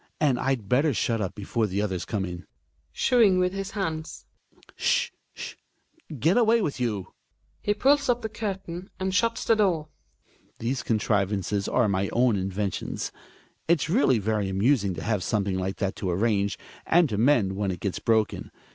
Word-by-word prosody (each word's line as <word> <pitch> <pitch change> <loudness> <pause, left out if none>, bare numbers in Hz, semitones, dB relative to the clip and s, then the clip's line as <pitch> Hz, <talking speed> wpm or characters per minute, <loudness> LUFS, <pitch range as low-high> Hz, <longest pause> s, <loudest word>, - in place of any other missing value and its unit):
And 140 -5 +2
I'd 130 -6 -1
better 140 +4 +2
shut 115 0 0
up 95 - -3
before 110 +2 -1
the 100 0 -2
others 95 -4 -2
come 100 -3 -2
in. 90 0 -7 0.4
{Shooing 225 -7 +4
vHth 180 0 +2
his 195 +1 -4
hands.) 160 -5 -4 0.5
S'h! 485 0 +1 0.3
s'h! - - -6 0.6
Get 165 - +3
away 230 0 +4
with 155 - -2
you! 105 -6 -2 0.5
{He 205 - 0
pulls 280 +4 +3
up 245 -1 +1
the - - 0
curtain 195 -4 -5
and 190 0 -1
shuts 230 +5 +1
the 225 - +4
doors.) 170 -7 +1 0.7
These 125 +3 -2
contrivances 105 -2 0
are 120 -3 +2
my 100 -1 0
own 120 -2 +3
inventions. 95 0 -3 0.6
It's 160 -1 +2
really 175 - +4
very 105 -1 -1
amusing 100 0 +2
to 80 - -6
have 105 0 0
something 100 -1 0
like 95 +1 -2
that 95 -2 -2
to 95 - -2
arrange, 100 +2 +1 0.3
and 170 -1 +5
to 105 -2 -2
mend 115 -7 +3
when 100 0 -1
it 90 -2 -3
gets 95 0 -3
broken. 110 -2 0
115 Hz, 170 wpm, -26 LUFS, -, 0.7 s, and